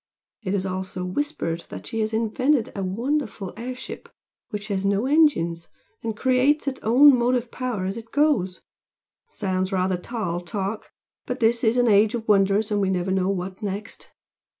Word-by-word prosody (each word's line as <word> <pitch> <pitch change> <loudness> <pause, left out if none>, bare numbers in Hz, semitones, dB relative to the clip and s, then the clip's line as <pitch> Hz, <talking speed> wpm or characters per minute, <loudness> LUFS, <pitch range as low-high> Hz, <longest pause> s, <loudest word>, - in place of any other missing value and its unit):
It 200 -2 -1
is 190 -1 -1
also 185 -1 -4
whispered 180 - -2
that - - -8
she 225 - -4
has 215 0 0
invented 230 +4 +1
a 200 - -3
wonderful 225 +1 -2
air 250 +2 -5
ship 260 - -9 0.4
which 210 0 -5
has 195 -1 -1
no 200 +3 +1
engines, 260 - +2 0.3
and 225 -2 -4
creates 260 +4 +2
its 265 -1 -2
own 260 +5 +7
motive 245 0 +1
power 245 -7 -3
as 195 +3 -3
it 225 0 -10
goes! 275 -12 +1 0.7
Sounds 190 - -2
rather 185 -1 +1
tall 180 -3 -3
talk! 195 +4 -4 0.4
but 250 +1 -3
this 235 +1 +2
is 230 +1 +3
an 245 -1 +4
age 210 +2 +4
of 225 -1 -5
wonders 205 +1 +3
and 205 -1 +1
we 195 - +1
never 185 0 0
know 190 0 +1
what 185 +1 -3
next. 205 +1 -6
215 Hz, 175 wpm, -24 LUFS, 190-250 Hz, 0.7 s, own